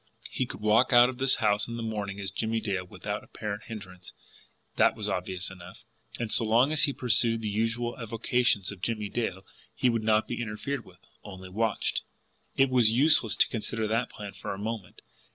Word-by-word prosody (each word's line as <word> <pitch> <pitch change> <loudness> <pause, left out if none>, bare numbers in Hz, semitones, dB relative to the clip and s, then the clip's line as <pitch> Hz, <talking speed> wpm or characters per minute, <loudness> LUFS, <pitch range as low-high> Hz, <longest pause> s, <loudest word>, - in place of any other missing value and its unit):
He 130 - -1
could - - -9
walk 110 +4 +3
out 120 0 +7
of 130 -1 -7
the 135 0 +3
house 105 -2 +2
in 115 0 -5
the 115 - -4
morning 105 -3 -4
as 100 -1 -4
Jimmie 110 0 -1
Dale 100 -4 -2
without 90 - -5
apparent 105 0 -6
hindrance 90 -5 -10 0.6
that - - +4
was - - -4
obvious 95 +1 -3
enough. 90 -2 -12 0.3
And 115 -2 -4
so - - +5
long 115 +6 +3
as 155 - +4
he 140 - -1
pursued 115 -3 +2
the - - -1
usual 115 +3 -1
avocations 115 -3 +1
of 100 -3 -11
Jimmie 105 -1 -2
Dale, 95 -5 -3 0.3
he 125 - +2
would 115 -1 -1
not 110 0 +2
be 120 - -4
interfered 115 +4 -4
with 95 0 -19 0.2
only 95 -2 -10
WATCHED. 110 +3 0 0.6
It 135 -1 +4
was 120 -4 +5
useless 125 -4 +5
to - - +5
consider 110 -1 -2
that 115 +2 0
plan 105 -1 -8
for - - -6
a - - -10
moment. 105 -2 -6
110 Hz, 195 wpm, -28 LUFS, 100-120 Hz, 0.6 s, out